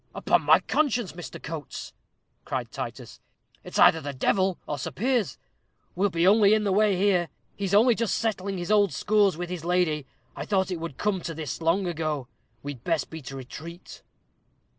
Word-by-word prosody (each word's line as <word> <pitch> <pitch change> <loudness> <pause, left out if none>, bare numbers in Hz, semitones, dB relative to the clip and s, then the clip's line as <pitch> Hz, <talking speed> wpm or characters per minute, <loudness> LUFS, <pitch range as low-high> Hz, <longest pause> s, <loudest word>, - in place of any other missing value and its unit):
"Upon - - +2
my - - +6
conscience, 250 - 0
Mr. 170 -5 -8
Coates," 150 -3 -7 0.5
cried - - -4
Titus, - - -7 0.4
"it's - - -6
either 160 - +6
the 145 -1 -5
devil, 185 +7 +1
or 145 - -4
Sir - - -3
Piers. 235 - 0 0.6
We'll 200 +3 +1
be 170 -1 +1
only 205 +1 +6
in 215 - 0
the 200 - +1
way 205 -1 +3
here. 180 -3 +2 0.3
He's 200 0 -1
only 235 +4 +6
just 230 -1 0
settling 200 -4 -2
his 175 +2 -3
old 205 -3 +4
scores 205 -5 +2
with 175 0 -5
his 175 -3 -5
lady. 170 -5 +1 0.3
I - - -4
thought 190 -2 0
it 175 - -3
would 165 -5 -6
come 205 -3 0
to 165 -1 -5
this 155 -1 -5
long 170 +4 +2
ago. 155 -6 -2 0.4
We'd 140 -4 -7
best 165 -3 -1
beat 160 -4 -8
a 135 - -7
retreat." 160 +7 -10
180 Hz, 185 wpm, -26 LUFS, 160-205 Hz, 0.6 s, my